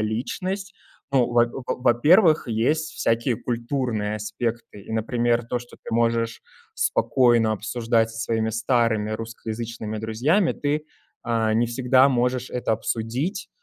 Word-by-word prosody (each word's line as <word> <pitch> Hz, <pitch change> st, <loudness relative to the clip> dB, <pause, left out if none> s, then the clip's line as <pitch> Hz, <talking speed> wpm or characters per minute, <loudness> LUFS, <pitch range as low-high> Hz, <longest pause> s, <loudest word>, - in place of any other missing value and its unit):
личность. 185 Hz, -, -3 dB, 0.4 s
Ну, 130 Hz, -3 st, +4 dB
в -, -, -5 dB, 0.3 s
во -, -, -1 dB
во-первых, 150 Hz, -, +4 dB
есть 150 Hz, +8 st, 0 dB
всякие 115 Hz, +1 st, 0 dB
культурные 115 Hz, -3 st, -2 dB
аспекты, 110 Hz, +1 st, -4 dB
и, 105 Hz, -, -9 dB
например, 120 Hz, +1 st, 0 dB
то, 120 Hz, +1 st, -2 dB
что 120 Hz, -, -14 dB
ты -, -, -4 dB
можешь 115 Hz, 0 st, 0 dB, 0.3 s
спокойно 115 Hz, -1 st, +3 dB
обсуждать 115 Hz, +1 st, 0 dB
со 115 Hz, -, -9 dB
своими 110 Hz, -1 st, -1 dB
старыми 115 Hz, -2 st, +1 dB
русскоязычными 115 Hz, 0 st, -5 dB
друзьями, 130 Hz, -, +1 dB
ты, 150 Hz, +1 st, -2 dB, 0.4 s
э, 115 Hz, -2 st, +1 dB
не 115 Hz, +2 st, +2 dB
всегда 130 Hz, +2 st, +4 dB
можешь 125 Hz, -1 st, 0 dB
это 125 Hz, -2 st, -1 dB
обсудить, 115 Hz, -, -2 dB
115 Hz, 130 wpm, -24 LUFS, 110-125 Hz, 0.4 s, Ну